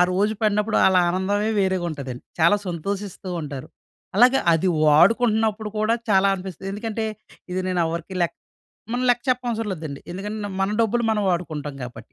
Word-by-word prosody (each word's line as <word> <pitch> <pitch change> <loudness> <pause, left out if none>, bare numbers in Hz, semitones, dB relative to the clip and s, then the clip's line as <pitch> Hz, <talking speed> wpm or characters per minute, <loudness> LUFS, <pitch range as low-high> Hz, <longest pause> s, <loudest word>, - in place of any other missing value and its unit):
ఆ - - +8
రోజు 205 +4 +2
పడినప్పుడు 210 0 +1
ఆళ్ళ 190 -1 +5
ఆనందమే 200 +4 0
వేరేగా 190 -2 +1
ఉంటదండి. 135 -4 -6 0.2
చాలా 170 +6 +5
సంతోషిస్తూ 190 +3 -4
ఉంటారు. 140 -3 -7 0.5
అలాగే 250 +4 +6
అది 165 +3 +2 0.2
వాడుకుంటున్నప్పుడు 215 +6 +3
కూడా 215 +2 +2 0.2
చాలా 195 0 +5
అనిపిస్తది. 190 0 -7
ఎందుకంటే, 220 +1 -3 0.5
ఇది 185 - -1
నేను 180 -1 0
ఎవరికీ 170 +3 -5
లెక్క 170 - 0 0.6
మనం 245 +1 -1
లెక్క 245 0 +1
చెప్పనవసరం 240 -3 -1
లేదండి. 155 -5 -6
ఎందుకంటే 205 +3 -4
మన 195 - +2
డబ్బులు 230 +1 +1
మనం 215 -1 +1
వాడుకుంటాం 155 -5 -3
కాబట్టి. 125 -1 -9
195 Hz, 155 wpm, -23 LUFS, 170-215 Hz, 0.6 s, ఆ